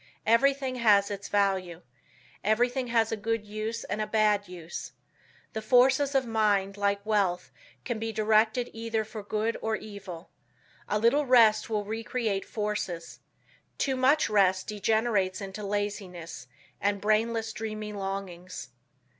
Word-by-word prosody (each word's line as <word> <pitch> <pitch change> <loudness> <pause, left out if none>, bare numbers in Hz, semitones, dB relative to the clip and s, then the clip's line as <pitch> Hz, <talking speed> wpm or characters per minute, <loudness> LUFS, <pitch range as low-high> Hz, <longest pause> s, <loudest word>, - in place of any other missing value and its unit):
Everything 265 +3 +2
has 205 -4 +4
its 200 0 -5
value. 190 -4 0 0.6
Everything 245 +4 +1
has 225 -2 +2
a - - +1
good 225 0 -2
use 215 +2 -4
and 205 +3 -3
a 215 - -1
bad 210 -1 +2
use. 175 -2 -8 0.6
The 220 - -3
forces 260 +5 +4
of 265 -1 +3
mind 205 -4 +1
like 200 0 0
wealth 200 -5 0 0.3
can 240 -3 -2
be 225 0 -3
directed 220 +3 +2
either 225 -1 -2
for 215 0 -7
good 215 +2 -1
or 220 0 0
evil. 195 -5 -9 0.6
A 210 - +2
little 265 +7 +3
rest 230 -4 +5
will 210 -2 -1
re 220 +2 -4
create 215 -5 -1
forces. 210 -6 -4 0.6
Too 270 -1 0
much 265 +4 +3
rest 190 -3 +3
degenerates 210 -2 0
into 195 +1 -6
laziness, 195 - -4 0.3
and 200 0 +1
brainless, 225 +2 +1
dreamy 215 -1 -5
longings. 190 -5 -5
215 Hz, 140 wpm, -28 LUFS, 200-225 Hz, 0.6 s, rest